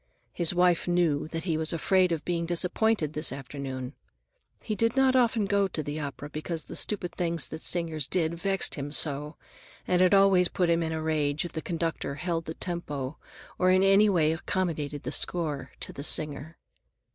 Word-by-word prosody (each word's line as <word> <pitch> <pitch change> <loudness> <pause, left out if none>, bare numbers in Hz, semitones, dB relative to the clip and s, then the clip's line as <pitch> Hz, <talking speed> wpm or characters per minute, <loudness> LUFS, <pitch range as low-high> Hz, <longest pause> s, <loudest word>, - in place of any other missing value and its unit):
His 170 -2 +1
wife 180 -1 +2
knew 170 -5 +1
that 165 0 -5
he 165 -4 -1
was 160 0 -1
afraid 180 +2 +2
of 165 -2 -2
being 170 -1 -1
disappointed 180 -1 +1
this 155 -3 +1
afternoon. 135 -1 -6 0.7
He 215 - -4
did 230 +2 0
not 265 -1 +4
often 235 -4 +3
go 200 0 +2
to 160 -4 -4
the 145 +2 -4
opera 145 0 -6
because 155 +2 -5
the - - -9
stupid 180 -5 0
things 170 -2 0
that 160 - -7
singers 165 -5 +1
did 170 -3 +1
vexed 195 +3 0
him 145 0 -3
so, 150 0 +1 0.5
and 180 0 +2
it 185 - +5
always 195 -2 +5
put 175 -1 0
him 170 0 +2
in 160 -1 -2
a 160 0 -3
rage 155 -1 0
if 175 - -7
the 160 - -4
conductor 165 -4 -3
held 165 0 -3
the 160 - -6
tempo 150 -6 -4 0.4
or 185 - +3
in 185 +1 +4
any 195 +2 +5
way 160 -5 +3
accommodated 160 -4 -2
the - - -4
score 155 -6 -1
to - - -6
the 140 - -7
singer. 150 +1 -1
165 Hz, 190 wpm, -27 LUFS, 150-180 Hz, 0.7 s, it